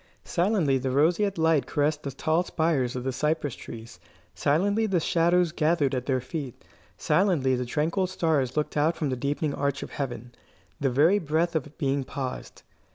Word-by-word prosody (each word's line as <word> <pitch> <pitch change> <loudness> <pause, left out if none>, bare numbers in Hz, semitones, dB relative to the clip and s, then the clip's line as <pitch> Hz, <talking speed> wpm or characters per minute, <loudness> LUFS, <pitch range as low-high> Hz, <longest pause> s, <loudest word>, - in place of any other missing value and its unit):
Silently 175 -7 +1
the 130 +1 -2
roseate 170 +9 +2
light 160 -3 +2
caressed 150 0 0
the 140 - -4
tall 155 +5 0
spires 160 -8 0
of 125 - -3
the 130 - -1
cypress 150 +1 -1
trees; 115 -5 -10 0.3
silently 200 +9 +1
the 190 -4 +1
shadows 170 +1 +2
gathered 155 -3 +1
at 125 -1 -2
their 130 -2 +1
feet; 130 0 -7 0.3
silently 150 -6 +2
the 125 -1 -1
tranquil 165 +8 0
stars 155 -8 0
looked 150 - -1
out 155 +3 +2
from 150 -4 -1
the - - 0
deepening 140 +3 -2
arch 140 -1 -1
of - - -9
heaven. 120 -4 -5 0.5
The 140 - +1
very 155 +11 +4
breath 165 +1 0
of 150 -1 -3
being 140 -3 0
paused. 130 0 -6
150 Hz, 170 wpm, -26 LUFS, 135-165 Hz, 0.5 s, very